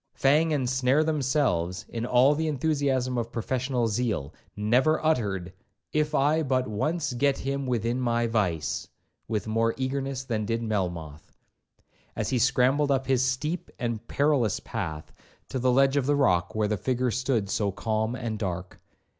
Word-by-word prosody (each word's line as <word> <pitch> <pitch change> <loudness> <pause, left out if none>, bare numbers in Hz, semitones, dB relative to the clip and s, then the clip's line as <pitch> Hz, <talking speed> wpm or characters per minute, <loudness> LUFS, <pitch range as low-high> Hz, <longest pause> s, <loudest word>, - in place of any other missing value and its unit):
Fang 150 +4 +3
and 140 -4 +1
Snare1 130 +4 +2
themselves, 130 - 0
in 115 +1 -4
all 125 +3 +5
the 160 +2 -1
enthusiasm 135 -4 0
of 115 0 -4
professional 125 +1 -1
zeal, 105 - -1 0.2
never 125 +9 +2
uttered, 100 - 0 0.4
'if 150 0 +1
I 150 +4 +3
but 130 -3 0
once 150 +8 -1
get 140 +2 +2
him 135 0 -3
within 120 0 0
my 120 -1 +1
vice,' 95 - -1 0.4
with 110 -2 -2
more 115 +1 +1
eagerness 135 0 -2
than 115 -5 -2
did 115 +2 -2
Melmoth, 85 -8 -4 0.8
as - - -2
he 125 - +2
scrambled 130 +4 +3
up 135 -1 +1
his 130 -1 +2
steep 150 +7 -2
and 115 -3 -3
perilous 140 -8 +1
path, 80 -9 -5 0.4
to 130 - -2
the 130 +1 +2
ledge 135 +2 +4
of 135 -2 +1
the 145 - +3
rock 90 -11 +2
where 110 -1 +1
the 105 0 -1
figure 125 +3 0
stood 125 -4 0
so 100 -2 0
calm 110 +3 -1
and 110 -3 -4
dark. 90 -2 -4
125 Hz, 160 wpm, -27 LUFS, 110-135 Hz, 0.8 s, all